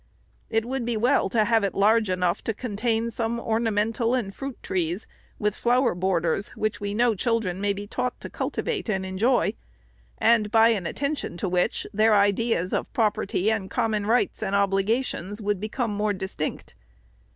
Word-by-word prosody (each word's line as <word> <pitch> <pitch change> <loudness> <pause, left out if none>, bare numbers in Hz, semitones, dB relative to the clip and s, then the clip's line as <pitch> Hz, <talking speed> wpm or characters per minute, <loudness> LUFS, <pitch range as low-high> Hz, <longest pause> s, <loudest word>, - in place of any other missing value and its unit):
It 225 0 +1
would 260 0 -2
be 235 -1 -1
well 245 -1 +2
to 215 +1 +2
have 225 -2 +3
it 200 - -1
large 215 +1 +3
enough 180 0 0
to 225 - -1
contain 230 0 -1
some 230 +1 -2
ornamental 225 +1 0
and 205 -6 -2
fruit 270 +1 -6
trees, 175 +1 -2 0.3
with 210 -1 0
flower 245 +3 +2
borders, 175 +1 0
which 215 -1 -2
we 205 0 -3
know 235 +1 +3
chil 230 +3 +1
dren 185 -3 -4
may 205 0 +1
be 200 +1 -4
taught 250 +4 -3
to - - -5
cultivate 430 - -3
and 190 -2 -1
enjoy; 215 +7 +1 0.6
and 220 -3 +3
by 225 +1 +5
an 200 -7 0
attention 280 - -3
to 190 - -2
which 180 0 0
their 215 +1 +4
ideas 200 -2 +2
of - - -2
property, 210 -2 +1
and 205 -4 -2
common 215 -3 0
rights, 240 +1 +1
and 200 -2 -1
obligations, 200 0 0
would 205 -2 -1
become 220 +3 -2
more 210 0 0
distinct. 190 -5 -5
215 Hz, 175 wpm, -25 LUFS, 195-235 Hz, 0.6 s, by